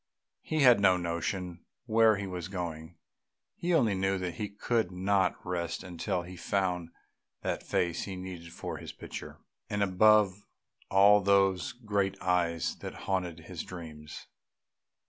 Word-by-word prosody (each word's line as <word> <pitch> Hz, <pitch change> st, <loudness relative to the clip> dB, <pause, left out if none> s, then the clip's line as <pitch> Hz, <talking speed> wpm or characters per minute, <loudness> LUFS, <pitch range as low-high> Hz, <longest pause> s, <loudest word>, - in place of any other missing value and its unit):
He 155 Hz, -1 st, -1 dB
had 125 Hz, -5 st, +7 dB
no 95 Hz, -2 st, +5 dB
notion 85 Hz, +1 st, -3 dB, 0.2 s
where 110 Hz, -2 st, +4 dB
he 100 Hz, -, -4 dB
was 90 Hz, -2 st, -5 dB
going; 85 Hz, -3 st, -5 dB, 0.6 s
he 175 Hz, -, -2 dB
only 125 Hz, -, +4 dB
knew 95 Hz, +1 st, +1 dB
that 90 Hz, -2 st, -3 dB
he 105 Hz, -, -2 dB
could 110 Hz, -1 st, -1 dB
not 95 Hz, 0 st, +1 dB
rest 85 Hz, -1 st, -3 dB
until 90 Hz, 0 st, -3 dB
he 90 Hz, +1 st, -9 dB
found 90 Hz, -2 st, -1 dB, 0.5 s
that -, -, -1 dB
face 85 Hz, -1 st, -1 dB
he 95 Hz, -, -5 dB
needed 90 Hz, -2 st, -8 dB
for -, -, -5 dB
his -, -, -8 dB
picture, -, -, -8 dB, 0.3 s
and 105 Hz, 0 st, 0 dB
above 100 Hz, 0 st, +4 dB, 0.5 s
all 100 Hz, +2 st, +6 dB
those 95 Hz, -4 st, +3 dB
great 100 Hz, -5 st, -1 dB
eyes 85 Hz, -3 st, 0 dB
that -, -, -7 dB
haunted 90 Hz, -3 st, -2 dB
his 85 Hz, 0 st, -6 dB
dreams. 80 Hz, -4 st, -9 dB
95 Hz, 145 wpm, -30 LUFS, 85-100 Hz, 0.6 s, had